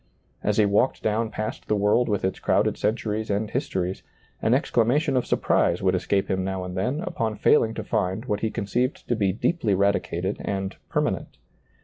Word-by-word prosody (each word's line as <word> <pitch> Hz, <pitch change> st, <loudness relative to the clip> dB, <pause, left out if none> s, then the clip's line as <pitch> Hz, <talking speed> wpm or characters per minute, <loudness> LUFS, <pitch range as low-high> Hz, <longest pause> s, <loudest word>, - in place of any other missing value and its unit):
As 105 Hz, 0 st, +1 dB
he 105 Hz, -, +5 dB
walked 100 Hz, +6 st, +1 dB
down 110 Hz, +1 st, 0 dB
past 110 Hz, 0 st, -5 dB
the 105 Hz, -, +2 dB
world 105 Hz, +4 st, +2 dB
with 100 Hz, -2 st, 0 dB
its 95 Hz, -, -2 dB
crowded -, -, +2 dB
centuries 110 Hz, 0 st, -1 dB
and 105 Hz, +1 st, -1 dB
histories, 95 Hz, -8 st, -2 dB, 0.4 s
an -, -, +3 dB
exclamation 135 Hz, +5 st, +2 dB
of 125 Hz, -, +1 dB
surprise -, -, +2 dB
would 95 Hz, -1 st, +3 dB
escape 95 Hz, +2 st, 0 dB
him 95 Hz, 0 st, 0 dB
now 95 Hz, 0 st, -3 dB
and 90 Hz, 0 st, -6 dB
then 125 Hz, -, -1 dB
upon 110 Hz, -8 st, -2 dB
failing 110 Hz, +2 st, +3 dB
to 110 Hz, -, -4 dB
find 105 Hz, 0 st, -1 dB
what 105 Hz, -4 st, -1 dB
he 110 Hz, -, 0 dB
conceived 120 Hz, +4 st, -2 dB
to 120 Hz, -, +2 dB
be 100 Hz, -3 st, +1 dB
deeply 110 Hz, -, 0 dB
radicated 100 Hz, -1 st, 0 dB
and 95 Hz, -1 st, -3 dB
permanent. -, -, -1 dB
105 Hz, 185 wpm, -25 LUFS, 95-115 Hz, 0.4 s, he